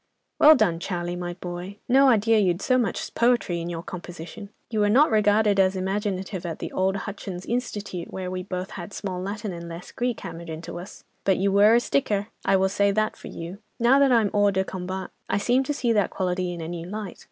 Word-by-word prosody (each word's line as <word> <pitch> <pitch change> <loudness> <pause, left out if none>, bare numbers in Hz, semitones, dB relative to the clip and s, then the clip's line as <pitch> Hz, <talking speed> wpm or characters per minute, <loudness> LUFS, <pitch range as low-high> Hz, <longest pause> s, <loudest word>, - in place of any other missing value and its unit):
"Well 310 +1 +9
done, 180 - +2
Charlie, 175 -1 -3
my 175 0 -4
boy! 180 +2 -7
No 270 +2 +6
idea 225 -1 +4
you'd 185 -2 +1
so 255 -1 +3
much 220 -7 -2
poetry 235 -8 +2
in 170 - -4
your 165 -1 -5
composition! 180 +3 -8 0.2
You 220 - 0
were 205 0 +3
not 270 +7 +5
regarded 210 -1 +3
as 190 0 +4
imaginative 190 -1 -2
at 165 -3 -4
the - - -6
old 190 +1 +1
'Hutchins 195 -3 -6
Institute,' 205 -7 -3
where 185 -1 -4
we 185 0 -3
both 185 +1 -5
had 175 +2 -8
'small 185 -3 -4
Latin 200 +1 -4
and 170 0 -7
less 170 +1 -8
Greek' 245 -1 -2
hammered 170 0 -7
into 165 +2 -6
us. 180 - -11 0.2
But 190 -1 +3
you 195 +1 +1
were 205 +3 +6
a - - +6
sticker, 215 -5 0
I - - +3
will 190 0 +3
say 200 +1 +2
that 215 +2 0
for - - -11
you. 170 +4 -7 0.2
Now 245 +4 +5
that 275 -2 +5
I'm 225 -4 +3
hors 205 -1 +3
de 190 0 +2
combat, 190 0 -5 0.2
I - - +1
seem 245 +6 +2
to 295 - -1
see 240 -5 +1
that 205 -4 +2
quality 180 -1 -1
in 170 -1 -6
a 160 - -5
new 170 0 -5
light. 210 0 -6
195 Hz, 220 wpm, -25 LUFS, 180-215 Hz, 0.2 s, Well